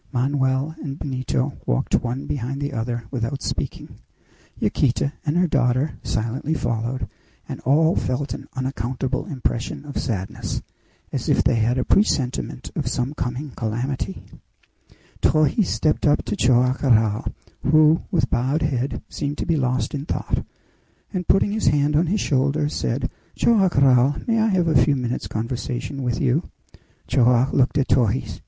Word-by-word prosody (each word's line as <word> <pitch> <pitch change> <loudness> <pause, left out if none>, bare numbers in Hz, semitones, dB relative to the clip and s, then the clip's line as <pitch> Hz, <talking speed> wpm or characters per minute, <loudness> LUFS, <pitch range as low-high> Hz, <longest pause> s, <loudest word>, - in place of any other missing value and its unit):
Manoel 135 +2 +1
and 140 -2 -5
Benito 130 0 -2
walked - - 0
one 125 +3 0
behind 135 0 -3
the 145 0 -3
other 120 0 -2
without 130 +1 -3
speaking. - - -4 0.6
Yaquita 140 +2 +1
and 150 +4 +2
her 180 - +4
daughter 135 -1 +1
silently 120 +8 -2
followed, 120 -2 -2 0.4
and - - -6
all 160 +6 +4
felt 130 +3 -1
an - - -8
unaccountable 130 +1 -2
impression 130 +1 -3
of 145 - -4
sadness, 100 -6 -3 0.5
as - - -2
if - - +3
they - - +3
had 115 +3 +2
a 130 - 0
presentiment 135 - 0
of - - -2
some 125 +3 -1
coming 130 +1 -4
calamity. 115 - -3 1.0
Torres 155 +6 +3
stepped 155 0 +1
up 145 - +2
to 105 - -2
Joam 125 +2 +3
Garral, 110 -5 +3 0.3
who, 155 +1 +5
with 175 -6 +1
bowed 135 +6 +1
head, 130 -3 -1
seemed 145 0 -4
to - - -2
be 165 - +1
lost 130 -4 0
in 145 +1 -4
thought, - - -1 0.7
and 180 -2 -3
putting 200 - +3
his 215 +1 -1
hand 145 0 +3
on 160 +3 +3
his 205 +5 +1
shoulder, 140 +2 +1
said, - - -1 0.3
"Joam 215 -5 +4
Garral, 135 -3 +4
may 230 -1 +2
I 220 - +3
have 185 -5 +2
a 145 -6 +5
few 140 +3 +2
minutes' 125 -2 -2
conversation 120 +4 -4
with 125 -2 -1
you?" 135 +7 +1 0.6
Joam 125 +1 +3
looked 130 +2 +2
at 140 - +2
Torres. 120 0 +1
130 Hz, 155 wpm, -23 LUFS, 120-150 Hz, 1.0 s, who